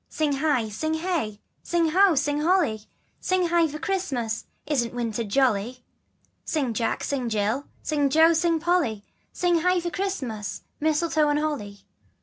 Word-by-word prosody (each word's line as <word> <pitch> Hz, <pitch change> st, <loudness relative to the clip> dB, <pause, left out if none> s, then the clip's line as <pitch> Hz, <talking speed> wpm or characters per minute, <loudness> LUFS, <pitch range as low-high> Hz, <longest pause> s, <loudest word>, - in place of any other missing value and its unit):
Sing 310 Hz, -2 st, 0 dB
hie, 275 Hz, -5 st, +1 dB
sing 315 Hz, +10 st, -2 dB
hey, 320 Hz, -, -2 dB, 0.2 s
Sing 340 Hz, -2 st, +1 dB
ho, 375 Hz, +1 st, +5 dB
Sing 290 Hz, +1 st, 0 dB
holly, 305 Hz, -, +1 dB, 0.3 s
Sing 370 Hz, -2 st, +1 dB
hie 340 Hz, -1 st, +3 dB
for 305 Hz, 0 st, -6 dB
Christmas! 275 Hz, -, -2 dB, 0.2 s
Isn't 245 Hz, -5 st, -1 dB
winter 235 Hz, -1 st, -2 dB
jolly? 245 Hz, +1 st, 0 dB, 0.6 s
Sing 275 Hz, -7 st, -1 dB
Jack, 225 Hz, +1 st, -1 dB
Sing 260 Hz, -4 st, -2 dB
Jill, 220 Hz, +6 st, 0 dB, 0.2 s
Sing 290 Hz, -2 st, +1 dB
Jo, 320 Hz, +3 st, +5 dB
Sing 335 Hz, 0 st, +2 dB
Polly, 310 Hz, -, 0 dB, 0.3 s
Sing 350 Hz, -1 st, +1 dB
hie 360 Hz, +2 st, +2 dB
for 345 Hz, 0 st, -4 dB
Christmas, 240 Hz, -, -4 dB, 0.2 s
Mistletoe 310 Hz, 0 st, +2 dB
and 290 Hz, -, +2 dB
Holly. 255 Hz, -10 st, -3 dB
295 Hz, 145 wpm, -25 LUFS, 235-335 Hz, 0.6 s, ho